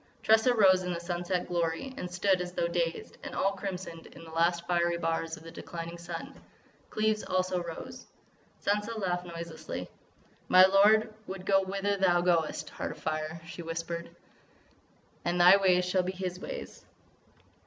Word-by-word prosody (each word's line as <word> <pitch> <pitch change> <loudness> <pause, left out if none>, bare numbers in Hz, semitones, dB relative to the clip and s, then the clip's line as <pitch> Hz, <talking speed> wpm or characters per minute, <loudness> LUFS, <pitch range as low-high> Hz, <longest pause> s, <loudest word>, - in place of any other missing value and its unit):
Tressa 220 +3 +5
rose 190 -4 +6
in 180 0 -3
the 170 - -3
sunset 175 +1 -2
glory 175 +8 -1
and 180 -9 -5
stood 185 +1 +2
as 180 0 -5
though 170 - 0
dazed, 170 -1 -2
and - - -6
all 195 - +2
crimsoned 190 -4 -6
in - - -13
the 165 - -11
last 170 +1 +1
fiery 175 -1 +1
bars 165 0 -2
of 155 - -14
the 165 - -10
declining 170 0 -7
sun. 170 -1 -6 0.6
Cleves 215 0 +1
also 185 -1 0
rose. 170 -1 -8 0.6
Sansa 210 +3 0
laughed 180 -3 -2
noiselessly: 160 - -6 0.6
"My 185 0 +8
lord 210 +3 +5
would 190 -1 -6
go 195 0 +4
whither 195 +1 -1
thou 180 -2 +3
goest, 170 -3 0
Heart - - -4
of - - -16
Fire!" 155 +1 -3
she 170 - -8
whispered. 165 +1 -4 1.1
"And 175 +1 0
thy 180 +3 +8
ways 180 -2 +3
shall 185 +1 +2
be 185 +1 -3
his 180 -1 -4
ways!" - - -7
180 Hz, 165 wpm, -30 LUFS, 170-195 Hz, 1.1 s, My